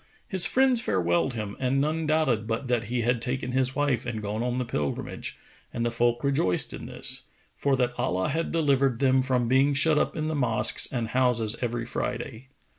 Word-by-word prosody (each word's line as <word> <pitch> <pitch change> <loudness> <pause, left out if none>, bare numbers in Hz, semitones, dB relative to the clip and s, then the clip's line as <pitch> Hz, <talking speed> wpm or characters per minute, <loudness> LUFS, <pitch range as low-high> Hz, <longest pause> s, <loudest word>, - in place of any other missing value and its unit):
His 190 -3 +3
friends 260 -2 +3
farewelled 90 - +1
him 105 -3 -5
and 130 +1 +1
none 155 +2 -1
doubted 145 -9 +1
but 115 +4 -2
that 120 -2 0
he 120 +3 -2
had 120 0 +1
taken 125 +1 -2
his 130 0 0
wife 145 -5 0
and 120 -3 -4
gone 105 +1 -3
on 125 +1 -1
the 125 - -1
Pilgrimage, 75 -10 -4 0.3
and 120 - -2
the 120 - 0
folk 120 +1 +1
rejoiced 135 -11 +1
in - - -7
this, - - -5 0.3
for 140 -1 0
that 125 -2 0
Allah 95 -7 0
had 165 +1 -2
delivered 140 -6 +2
them 130 0 +3
from 130 -2 0
being 135 +3 +3
shut 150 +1 +3
up - - -1
in 155 0 -2
the 155 - -2
mosques 115 -6 +2
and 120 -3 -2
houses 120 -3 +2
every 120 -1 -2
Friday. 120 +1 -4
125 Hz, 195 wpm, -26 LUFS, 115-140 Hz, 0.3 s, His